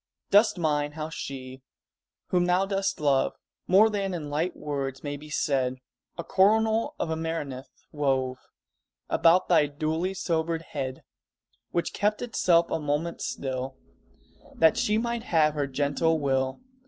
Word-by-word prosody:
Dost 205 0 +5
mind 150 -3 0
how 155 0 -4
she, 130 -4 -7 0.7
whom 180 -1 +2
thou 180 +2 +2
dost 195 0 -1
love 140 -3 +2 0.3
More 200 +4 +6
than 200 -3 -2
in 150 -4 -5
light 165 +5 -1
words 135 -3 -4
may 145 -1 -3
be 150 +2 -11
said, 130 -4 0 0.4
A 170 - -4
coronal 220 - +2
of 160 - -2
amaranth 160 -5 -4 0.2
wove 130 -3 0 0.7
About 170 +2 +4
thy 165 -4 +4
duly 160 +6 -2
sobered 165 -2 -1
head, 130 -4 -5 0.7
Which 170 - -2
kept 210 +2 0
itself 175 -8 +2
a 165 - 0
moment 150 +3 -2
still 130 0 -4 0.8
That 160 -1 +5
she 210 +1 +1
might 235 +1 -1
have 160 -9 +2
her 145 -2 -1
gentle 145 +4 +1
will? 135 - 0
160 Hz, 140 wpm, -27 LUFS, 140-185 Hz, 0.8 s, More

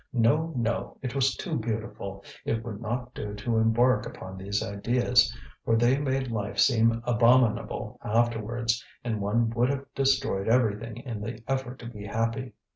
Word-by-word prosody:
No, 140 +8 +3
no, 115 -1 -1
it 125 - -3
was 135 -1 +2
too 165 -5 -3
beautiful; 110 -3 -4 0.2
it 115 0 -1
would 110 -2 -6
not 120 +2 -3
do 105 -1 -5
to 110 +2 -1
embark 120 +3 +3
upon 95 0 -8
these 100 +2 -2
ideas, 120 +3 +2 0.3
for 115 - +2
they 120 +3 +4
made 135 -3 -1
life 105 -2 -3
seem 115 -2 +4
abominable 120 -1 +2
afterwards, 115 +1 0 0.2
and 110 -3 -2
one 115 +3 +1
would 120 +2 +2
have 140 0 -2
destroyed 135 -7 +1
everything 115 -1 +1
in 120 -4 -6
the 110 +1 -6
effort 130 -1 -2
to 120 - -11
be 105 -3 -7
happy. 115 +4 -2
115 Hz, 160 wpm, -27 LUFS, 110-125 Hz, 0.3 s, they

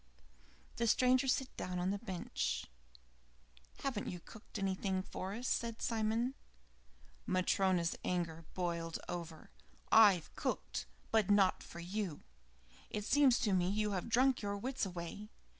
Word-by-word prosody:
The 235 - +1
stranger 255 +3 +4
sat 260 0 0
down 180 0 -3
on 180 +2 0
the 200 - -2
bench. 190 -5 -2 1.2
"Haven't 255 -7 -1
you 180 - -4
cooked 215 +5 -11
anything 190 -1 -1
for 190 +1 -5
us?" 245 +3 -4
said 230 -1 -1
Simon. 225 +2 0 0.9
Matryona's 185 -2 +2
anger 165 -2 -2
boiled 170 -2 -2
over. 165 -2 -6 0.4
"I've 205 -7 +6
cooked, - - -2 0.2
but 220 -3 +3
not 200 -2 +4
for 170 - -10
you. 185 -3 -3 0.7
It 210 -1 -3
seems 275 -2 +5
to 210 -6 +2
me 180 -1 +2
you 210 +1 +1
have 190 +2 -2
drunk 255 +2 +4
your 205 -1 -2
wits 250 0 -2
away. 180 +4 -6
200 Hz, 135 wpm, -36 LUFS, 180-225 Hz, 1.2 s, I've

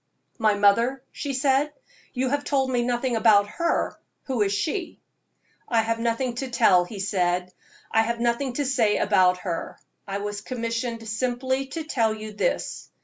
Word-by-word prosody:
"My 215 -2 +3
mother?" 230 +6 +3
she 285 - -4
said 275 +2 +2 0.4
"you 255 0 -1
have 285 +2 0
told 270 -3 +1
me 245 -1 +2
nothing 240 0 0
about 215 -2 +5
her. 335 +10 -1 0.3
Who 260 -5 -2
is 200 -1 +2
she?" 315 - -2 0.7
"I 230 -2 +3
have 230 +1 -1
nothing 235 +2 0
to 265 +1 -3
tell," 195 -7 +4
he 200 +2 -8
said; 180 -2 0 0.4
"I 225 - +4
have 235 +1 -1
nothing 240 +2 0
to 285 +3 -1
say 240 -6 +2
about 185 -3 +3
her. 170 -3 -4 0.3
I 195 0 -2
was 205 0 -4
commissioned 230 -1 -3
simply 255 +4 -1
to 320 +4 -5
tell 230 -8 +1
you 215 0 -8
this. - - -2
235 Hz, 165 wpm, -25 LUFS, 210-260 Hz, 0.7 s, about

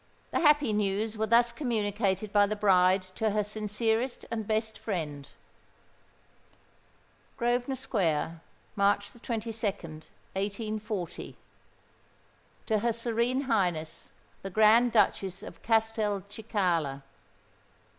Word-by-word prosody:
The - - +1
happy 295 -7 +4
news 210 +1 0
were 220 0 -1
thus 235 +1 +4
communicated 210 -5 -1
by 205 -1 +5
the 215 - -2
bride 185 -2 +4
to 220 +3 0
her 210 0 +1
sincerest 220 +4 -1
and 220 -3 -3
best 220 0 -1
friend:— 150 -9 -4 2.1
"Grosvenor 245 +2 0
Square, 165 - -1 0.3
"March 200 0 +2
22nd, 215 -9 -4 0.3
1840. 210 -1 -4 1.3
TO 220 -2 +1
HER 235 +2 +1
SERENE 235 +3 0
HIGHNESS 180 - -1 0.3
THE 195 - -5
GRAND 220 +4 +5
DUCHESS 195 -3 +1
OF - - -10
CASTELCICALA. 205 -8 0
215 Hz, 95 wpm, -29 LUFS, 195-230 Hz, 2.1 s, by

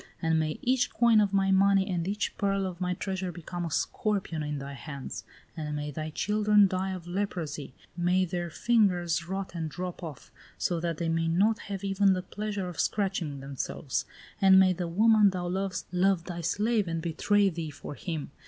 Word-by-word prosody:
And 160 -1 +2
may 155 -1 -1
each 255 0 +2
coin 230 -2 +5
of 205 -2 +1
my 195 -1 +2
money 195 0 +4
and 175 -3 -1
each 205 +1 -2
pearl 195 -1 0
of 185 -1 -6
my 180 0 0
treasure 190 -1 -3
become 175 +1 -5
a - - -3
scorpion 190 -1 -1
in 150 0 -3
thy 140 0 -6
hands! 140 0 -7 0.3
And 150 -2 -4
may 150 0 -3
thy 155 +2 -4
children 210 +4 +3
die 185 +1 -2
of 185 -3 -5
leprosy, 175 -7 -4 0.2
may 180 +2 +2
their 175 -1 -3
fingers 175 -5 +2
rot 190 -1 -4
and 165 -2 -3
drop 180 +2 -5
off, 155 -6 -8 0.3
so 175 -2 0
that 165 -1 -2
they 170 - -2
may 165 0 +1
not 205 +7 +3
have 195 -1 -4
even 195 0 +3
the 185 -1 -2
pleasure 205 0 -4
of 175 - -7
scratching 185 -9 -1
themselves! 135 0 -3 0.4
And 190 -1 +8
may 185 -1 +5
the 175 0 -3
woman 210 +3 +5
thou 180 -2 -3
lovest 190 +1 -2
love 180 -1 +2
thy 175 -1 -5
slave 210 +4 +1
and 165 0 -2
betray 195 +5 +2
thee 165 -3 -4
for 145 - -8
him. 155 -2 -5
180 Hz, 190 wpm, -29 LUFS, 165-195 Hz, 0.4 s, And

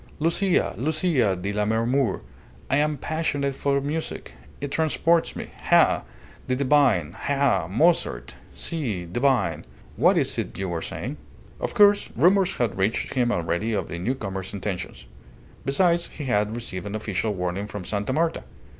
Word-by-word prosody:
"Lucia, 170 +4 +1
Lucia 150 - +1
di 100 +3 -4
Lammermoor! 110 +3 +1 0.5
I 140 - +4
am 150 0 +1
passionate 145 -2 -1
for 140 0 +1
music. 150 +3 -4 0.3
It 145 0 -4
transports 160 +2 +2
me. - - -7
Ha! - - +4 0.4
the 130 - +1
divine 130 - +3
ha! 135 - +1
Mozart. 100 - +1 0.2
Si! 115 - -3
divine... 120 - +1 0.3
What - - +4
is - - +1
it - - -4
you 95 -1 -2
were 85 -1 -2
saying?" - - -5 0.4
Of - - -3
course, 205 0 +5
rumours 185 +6 +4
had 120 -5 -1
reached 100 +4 0
him 125 -3 +2
already 85 +4 -1
of 105 - -2
the 85 - -5
newcomer's 95 -3 -3
intentions. 95 -10 -5 0.6
Besides, 170 +5 +2
he 150 - -8
had 105 -3 +1
received 105 -5 -5
an 100 - -4
official 105 0 -2
warning 90 +3 -2
from 105 -3 -6
Sta. 100 +5 -2
Marta. 165 +4 0
120 Hz, 145 wpm, -25 LUFS, 100-150 Hz, 0.6 s, course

